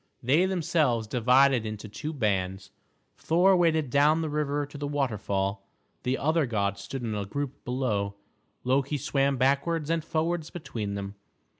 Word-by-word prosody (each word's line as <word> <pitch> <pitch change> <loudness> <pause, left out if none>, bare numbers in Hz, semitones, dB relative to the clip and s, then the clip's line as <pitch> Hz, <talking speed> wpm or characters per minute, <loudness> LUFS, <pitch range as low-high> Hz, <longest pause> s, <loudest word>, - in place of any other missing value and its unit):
They 150 +10 +4
themselves 160 -10 +1
divided 125 +2 +4
into 110 0 -6
two 150 +9 -5
bands. 95 - -1 0.5
Thor 180 +4 +4
waded 160 -6 +2
down 150 +4 +4
the 155 - -3
river 145 -1 -1
to 145 - -16
the 145 - -3
waterfall; 105 -8 -1 0.4
the 130 +1 0
other 155 0 +1
gods 100 -3 -1
stood 135 +4 -6
in 110 -2 -2
a 105 -1 -2
group 140 +7 -5
below. 110 -6 -1 0.5
Loki 135 +3 +1
swam 140 0 +1
backwards 145 +5 +1
and 165 -1 0
forwards 165 0 -1
between 110 -11 -5
them. 100 0 -5
135 Hz, 150 wpm, -27 LUFS, 110-155 Hz, 0.5 s, They